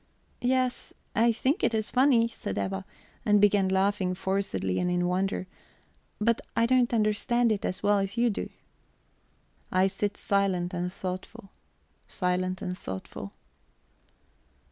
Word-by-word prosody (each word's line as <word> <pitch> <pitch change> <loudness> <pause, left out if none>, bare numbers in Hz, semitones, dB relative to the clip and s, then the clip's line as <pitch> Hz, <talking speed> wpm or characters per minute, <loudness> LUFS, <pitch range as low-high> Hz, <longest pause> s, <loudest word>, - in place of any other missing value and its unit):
"Yes, 255 0 0 0.2
I 235 +2 +4
think 265 - 0
it 225 - +2
is 215 -1 -1
funny," 250 -3 +4
said 100 - -6
Eva, 95 -1 -2 0.4
and 210 -1 +4
began 205 -1 +4
laughing 190 -1 +1
forcedly 180 - -1
and 180 - 0
in 175 0 +1
wonder. 185 +1 0 0.7
"But 230 +2 +2
I 230 - +4
don't 250 0 +3
understand 230 +2 +2
it 205 -2 -1
as 185 +2 -3
well 205 0 +4
as 195 +3 -3
you 240 0 +3
do." - - -4 1.2
I 185 +1 +4
sit 205 +1 -1
silent 190 -3 0
and 180 0 -2
thoughtful, 190 +3 -6 0.6
silent 185 0 -1
and 180 - -3
thoughtful. 95 - -7
200 Hz, 135 wpm, -28 LUFS, 180-230 Hz, 1.2 s, I